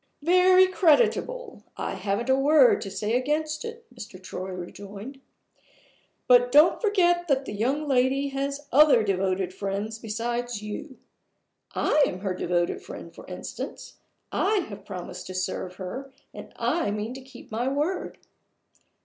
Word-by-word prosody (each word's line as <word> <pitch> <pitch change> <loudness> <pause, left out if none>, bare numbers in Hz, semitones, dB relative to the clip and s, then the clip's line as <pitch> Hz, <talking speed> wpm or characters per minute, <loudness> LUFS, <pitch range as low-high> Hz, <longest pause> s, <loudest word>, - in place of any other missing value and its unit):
"Very 365 +2 +6
creditable; 465 +8 +2 0.2
I - - -3
haven't 200 +5 -2
a - - +5
word 310 - +5
to 195 - -5
say 210 +4 -2
against 305 +4 -1
it," 460 0 -8
Mr. 200 -3 -10
Troy 185 0 -6
rejoined. 200 +8 -8 1.1
"But 245 0 +5
don't 300 +5 +6
forget 350 -5 +2
that 275 -2 +1
the - - -6
young 265 +9 -1
lady 270 +1 +2
has 275 +1 -3
other 285 -5 +6
devoted 190 -2 0
friends 200 +3 -4
besides 235 +1 -3
you. 255 +6 -7 0.8
I 300 - +3
am 185 - -5
her 195 -2 -1
devoted 175 -1 -1
friend, - - -10
for - - -13
instance - - -7 0.3
I 405 0 +2
have 200 -1 -10
promised 180 -2 -7
to 185 - -7
serve 185 0 -3
her, 255 +10 -7 0.2
and - - -10
I 340 -10 0
mean 210 +3 -3
to 265 - -9
keep 265 -3 -14
my 235 +3 -1
word. 295 +7 -2
250 Hz, 145 wpm, -26 LUFS, 200-305 Hz, 1.1 s, Very